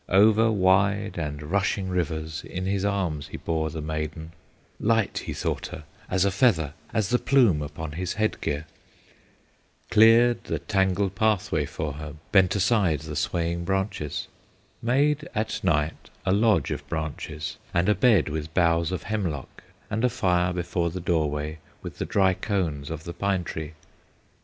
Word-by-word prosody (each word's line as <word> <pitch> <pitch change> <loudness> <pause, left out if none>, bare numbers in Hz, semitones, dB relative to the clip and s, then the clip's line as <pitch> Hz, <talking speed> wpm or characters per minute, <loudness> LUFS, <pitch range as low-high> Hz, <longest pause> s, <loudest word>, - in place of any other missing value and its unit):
Over 110 +4 +5
wide 100 0 +2
and 75 -2 -4
rushing 95 +3 0
rivers 80 -3 -2
In 95 0 -5
his 95 0 0
arms 90 -8 -1
he - - -7
bore 80 -1 -1
the 80 0 -5
maiden; 80 +1 -4 0.5
Light 110 -1 +1
he - - -2
thought - - -2
her 80 - -8 0.3
as 95 +1 +2
a 100 - +2
feather, 95 - +2 0.2
As 110 -4 0
the 125 - +3
plume 120 - +4
upon 75 +2 -5
his 90 +4 -3
head 110 0 -1
gear; 75 0 -2 1.3
Cleared 115 +2 +6
the - - -1
tangled 95 -1 +1
pathway 100 -7 +1
for 75 -2 -4
her, 75 +1 -7 0.2
Bent 95 -2 +4
aside 95 - +2
the 75 -1 -6
swaying 85 +3 -1
branches, 95 -5 -2 0.5
Made 145 +5 +1
at 110 +1 -2
night 75 -4 0 0.2
a 95 - +2
lodge 105 +1 +3
of - - -5
branches, 80 -1 -4
And 85 +2 +1
a 105 - +5
bed 115 - +4
with 80 +1 -4
boughs 85 -1 +3
of 90 - -3
hemlock, 90 -11 -4 0.3
And 110 +2 -1
a 125 - +4
fire 90 -7 +1
before 85 -1 -1
the 90 +3 -5
doorway 75 -3 -1 0.2
With - - -8
the - - -1
dry 95 -2 +3
cones 85 -9 -2
of 80 -1 -5
the 85 - -6
pine 95 0 0
tree. 80 -1 -6
90 Hz, 160 wpm, -26 LUFS, 80-100 Hz, 1.3 s, Cleared